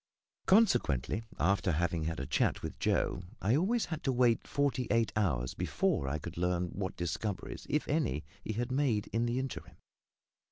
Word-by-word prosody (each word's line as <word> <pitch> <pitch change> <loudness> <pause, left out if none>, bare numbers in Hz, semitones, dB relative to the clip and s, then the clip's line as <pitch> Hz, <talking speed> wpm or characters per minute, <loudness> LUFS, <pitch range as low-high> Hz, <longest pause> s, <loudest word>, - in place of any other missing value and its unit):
Consequently, 120 - +3 0.2
after 95 0 +2
having 85 0 0
had 80 0 -2
a 70 - -3
chat - - +1
with - - -5
Joe, - - +1 0.2
I 110 +6 +2
always 215 +9 +2
had 160 -2 -5
to 135 - +3
wait 120 -2 +2
forty 130 -4 0
eight 115 -3 +2
hours 70 - 0
before 70 - 0
I 70 +3 -1
could 80 +3 -8
learn 90 0 0
what 95 0 -4
discoveries 85 +3 -3
if - - 0
any 70 +4 0 0.2
he 110 - -3
had 120 +3 -2
made 130 -6 +1
in 115 +1 +1
the 120 +1 0
interim. 130 0 -5
105 Hz, 170 wpm, -32 LUFS, 85-125 Hz, 0.2 s, Consequently